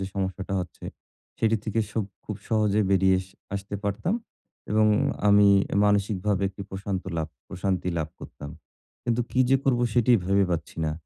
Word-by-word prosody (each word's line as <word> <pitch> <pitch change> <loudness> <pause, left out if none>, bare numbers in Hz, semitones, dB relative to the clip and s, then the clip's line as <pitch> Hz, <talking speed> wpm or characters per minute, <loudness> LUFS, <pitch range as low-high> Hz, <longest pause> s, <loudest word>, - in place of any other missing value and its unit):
যে - - -1
সমস্যাটা 95 0 -3
হচ্ছে, 90 -2 -8 0.5
সেটি 110 0 +3
থেকে 115 +1 0
সুব 110 -1 -1 0.2
খুব 105 - -5
সহজে 110 -2 +2
বেরিয়ে 95 -1 +3 0.3
আসতে 100 +1 -5
পারতাম। 105 - 0 0.6
এবং 110 0 +4 0.4
আমি 100 0 +7 0.4
মানসিকভাবে 100 -1 +1
একটি 100 +1 -8
প্রশান্ত 95 -1 -3
লাভ 80 -1 -2 0.2
প্রশান্তি 95 -1 -1
লাভ 80 -1 -2
করতাম। 70 - -9 0.5
কিন্তু 120 0 +1
কি 130 - +1
যে 135 - +6
করবো 125 -3 +2
সেটিই 120 -1 +5
ভেবে 100 +1 +3
পাচ্ছি 80 -3 -3
না। 80 - 0
100 Hz, 150 wpm, -26 LUFS, 95-110 Hz, 0.6 s, আমি